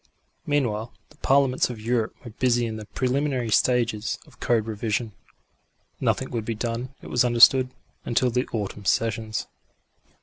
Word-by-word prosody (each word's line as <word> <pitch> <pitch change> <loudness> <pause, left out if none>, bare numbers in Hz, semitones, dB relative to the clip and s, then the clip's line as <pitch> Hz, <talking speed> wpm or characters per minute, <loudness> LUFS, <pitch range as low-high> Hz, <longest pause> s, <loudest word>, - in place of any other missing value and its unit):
Meanwhile 120 -6 0 0.2
the - - -21
Parliaments 135 -2 +2
of 120 -3 -6
Europe 115 0 -1
were 120 - -7
busy 120 +1 +1
in 110 -1 -4
the 105 -1 -9
preliminary 130 -2 -1
stages 115 -2 +2
of - - -21
code 115 -3 +1
revision. 110 +1 -2 0.9
Nothing - - 0
would 115 -2 -2
be 115 +1 -3
done, 120 +4 -4
it - - -9
was 125 - +2
understood, 125 +2 +6 0.3
until 120 +1 +1
the 125 +2 0
autumn 105 -2 -4
sessions. 110 0 0
120 Hz, 145 wpm, -25 LUFS, 110-125 Hz, 0.9 s, understood